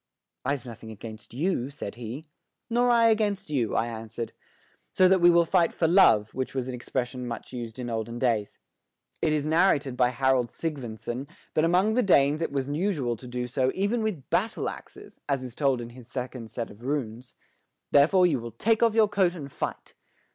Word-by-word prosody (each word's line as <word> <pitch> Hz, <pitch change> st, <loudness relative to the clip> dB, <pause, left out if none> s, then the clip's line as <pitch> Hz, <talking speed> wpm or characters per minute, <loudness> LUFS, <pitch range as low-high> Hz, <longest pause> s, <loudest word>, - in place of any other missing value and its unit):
"I've 135 Hz, -1 st, -2 dB
nothing 115 Hz, -2 st, -9 dB
against 110 Hz, -1 st, -10 dB
you," 140 Hz, -1 st, -1 dB
said 140 Hz, -8 st, -6 dB
he. 120 Hz, +6 st, -7 dB, 0.5 s
"Nor 245 Hz, +1 st, +3 dB
I 230 Hz, -1 st, +5 dB
against 210 Hz, -6 st, 0 dB
you," 125 Hz, -7 st, 0 dB
I 115 Hz, -, +2 dB
answered. 115 Hz, 0 st, -6 dB, 0.6 s
"So 185 Hz, -, +5 dB
that 190 Hz, -1 st, +4 dB
we 175 Hz, -, +8 dB
will 170 Hz, 0 st, +5 dB
fight 170 Hz, 0 st, +2 dB
for 165 Hz, -, +2 dB
love, 115 Hz, -, +5 dB
which 130 Hz, +1 st, -4 dB
was 130 Hz, -1 st, -2 dB
an 130 Hz, -, -4 dB
expression 125 Hz, 0 st, -3 dB
much 120 Hz, +2 st, -7 dB
used 120 Hz, -2 st, -6 dB
in 125 Hz, -1 st, -5 dB
olden 115 Hz, 0 st, -3 dB
days. 115 Hz, -5 st, 0 dB, 0.6 s
It 160 Hz, -, +2 dB
is 150 Hz, -1 st, 0 dB
narrated 155 Hz, -5 st, +2 dB
by 125 Hz, -1 st, +3 dB
Harold 130 Hz, -1 st, +1 dB
Sygvynson 130 Hz, -4 st, -5 dB, 0.3 s
that 155 Hz, -, +3 dB
among 185 Hz, +6 st, +3 dB
the 250 Hz, -, +3 dB
Danes 150 Hz, -, +4 dB
it 165 Hz, -, -1 dB
was 135 Hz, -2 st, -1 dB
usual 145 Hz, -5 st, -1 dB
to 125 Hz, +3 st, -11 dB
do 125 Hz, 0 st, -3 dB
so 130 Hz, +1 st, 0 dB
even 205 Hz, +5 st, 0 dB
with 205 Hz, -11 st, -3 dB
battle -, -, 0 dB
axes, -, -, -12 dB
as 135 Hz, -2 st, 0 dB
is 125 Hz, -2 st, -7 dB
told 135 Hz, -2 st, +1 dB
in 120 Hz, 0 st, -7 dB
his 120 Hz, -1 st, -13 dB
second 125 Hz, -3 st, -6 dB
set 115 Hz, 0 st, -5 dB
of 105 Hz, -, -15 dB
runes. 125 Hz, -3 st, -4 dB, 0.6 s
Therefore 165 Hz, +6 st, +5 dB
you 150 Hz, -7 st, +2 dB
will 115 Hz, -1 st, -8 dB
take 220 Hz, -, +1 dB
off 230 Hz, -2 st, +4 dB
your 220 Hz, -2 st, +5 dB
coat 190 Hz, -3 st, +1 dB
and 140 Hz, -5 st, -8 dB
fight." -, -, -5 dB
135 Hz, 195 wpm, -27 LUFS, 120-175 Hz, 0.6 s, we